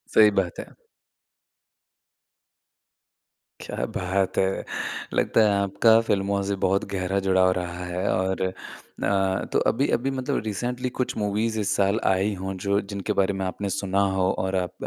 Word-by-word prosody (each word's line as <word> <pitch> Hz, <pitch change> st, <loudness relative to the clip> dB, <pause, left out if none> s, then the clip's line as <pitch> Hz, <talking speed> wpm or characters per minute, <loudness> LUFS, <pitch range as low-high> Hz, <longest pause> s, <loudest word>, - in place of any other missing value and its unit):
सही 105 Hz, -1 st, +7 dB
बात 90 Hz, -2 st, -7 dB
है। -, -, -8 dB, 2.9 s
क्या -, -, -3 dB
बात 95 Hz, +1 st, -1 dB
है! 95 Hz, 0 st, +1 dB, 0.5 s
लगता -, -, +3 dB
है 105 Hz, -, +4 dB
आपका 100 Hz, +3 st, +4 dB
फ़िल्मों 100 Hz, -2 st, 0 dB
से 100 Hz, 0 st, -1 dB
बहुत 95 Hz, +1 st, +1 dB
गहरा 95 Hz, +1 st, 0 dB
जुड़ाव 95 Hz, -1 st, +4 dB
रहा 90 Hz, 0 st, -4 dB
है 90 Hz, +2 st, -3 dB
और 95 Hz, 0 st, -1 dB, 0.6 s
अ, 95 Hz, -1 st, +1 dB
तो -, -, +4 dB
अभी 135 Hz, +5 st, 0 dB
अभी 135 Hz, +3 st, -2 dB
मतलब 130 Hz, -1 st, -2 dB
रिसेंटली 125 Hz, +4 st, -2 dB
कुछ 125 Hz, -, -1 dB
मूवीज़ 110 Hz, +2 st, 0 dB
इस 100 Hz, -1 st, 0 dB
साल 100 Hz, +2 st, +2 dB
आई 95 Hz, +2 st, +2 dB
हों 95 Hz, 0 st, -3 dB
जो 100 Hz, 0 st, +2 dB
जिनके 100 Hz, +1 st, -4 dB
बारे 100 Hz, +1 st, +1 dB
में 95 Hz, -1 st, -3 dB
आपने 100 Hz, +2 st, -3 dB
सुना 100 Hz, 0 st, 0 dB
हो 95 Hz, -1 st, +2 dB
और 95 Hz, 0 st, -1 dB
आप 90 Hz, -2 st, -1 dB
100 Hz, 155 wpm, -25 LUFS, 95-105 Hz, 2.9 s, सही